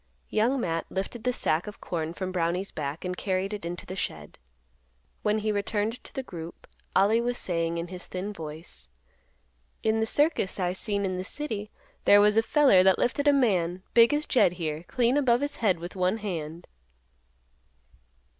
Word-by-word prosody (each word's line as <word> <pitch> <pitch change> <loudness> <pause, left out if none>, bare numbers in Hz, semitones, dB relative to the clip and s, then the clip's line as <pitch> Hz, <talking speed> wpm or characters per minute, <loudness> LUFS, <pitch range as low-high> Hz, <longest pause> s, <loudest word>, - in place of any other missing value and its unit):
Young 240 +5 +2
Matt 165 -6 -2
lifted 195 +4 -4
the 250 - +3
sack 165 -6 0
of 210 - -8
corn 160 -2 -3
from 185 0 -3
Brownie's 180 +2 -1
back 150 +3 -5
and 180 0 -2
carried 190 +1 -1
it 205 - -5
into 175 +1 -5
the 185 - -6
shed. 75 - -5 0.8
When 210 0 +1
he 215 0 0
returned 210 +3 -2
to - - -12
the 265 - -4
group, 170 -7 -9 0.3
Ollie 210 +4 +4
was 245 +1 -1
saying 165 -1 -1
in 170 +1 -4
his 180 -1 -8
thin 190 +3 -4
voice, 155 - -8 0.9
"In 220 0 +2
th' - - -1
circus 290 - +1
I 180 -1 0
seen 200 +1 -1
in 185 -1 -2
the 185 - -3
city 215 -2 -4 0.4
there 205 - +8
was 210 +1 +5
a 225 - +5
feller 260 -5 +5
that 190 0 +5
lifted 285 +4 0
a - - +8
man, 185 -10 +1
big 230 0 +7
as 295 +1 0
Jed 240 -12 +3
here, 160 -2 -4
clean 245 +2 +2
above 250 -3 +3
his 285 0 -2
head 200 -6 +2
with 175 +3 -8
one 185 +3 +1
hand." 170 -5 -5
195 Hz, 185 wpm, -27 LUFS, 175-225 Hz, 0.9 s, there